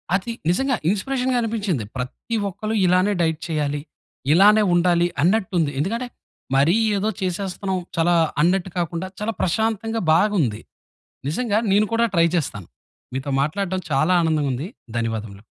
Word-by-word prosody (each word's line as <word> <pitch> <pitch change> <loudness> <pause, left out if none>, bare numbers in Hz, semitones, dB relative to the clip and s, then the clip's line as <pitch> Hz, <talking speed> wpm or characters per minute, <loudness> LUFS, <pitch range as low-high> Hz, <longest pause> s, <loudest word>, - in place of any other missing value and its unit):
అది 200 +4 -2 0.2
నిజంగా 265 +8 +2
ఇన్‌స్పిరేషన్‌గా 250 +5 0
అనిపించింది. 205 - -1
ప్రతి 130 - -5
ఒక్కలు 215 +4 -4
ఇలానే 185 +3 +3
డైట్ 160 -2 +1
చేయాలి. 145 -2 -1 0.5
ఇలానే 210 +4 +6
ఉండాలి 175 0 +3 0.2
అన్నట్టుంది. 185 -5 +1
ఎందుకంటే, 230 - -1 0.5
మరి 145 +7 +4 0.2
ఏదో 210 +3 0
చేసేస్తున్నాం, 190 +1 -2 0.2
చాలా 175 +1 +3 0.3
అన్నట్టు 185 +1 +1
కాకుండా, 170 +2 -3
చాలా 225 +1 -1
ప్రశాంతంగా 225 +3 0
బాగుంది. 165 - +2 0.7
నిజంగా 215 +5 0
నేను 210 +1 +4
కూడా 230 0 +3
ట్రై 170 0 +5
చేస్తాను. 105 - -3 0.5
మీతో 135 +1 -3
మాట్లాడడం 185 +3 -2
చాలా 180 +7 +3
ఆనందంగా 155 -4 +1
ఉంది. 155 +10 -5 0.3
ధన్యవాదములు. 110 -3 -4
185 Hz, 125 wpm, -22 LUFS, 160-215 Hz, 0.7 s, ఇలానే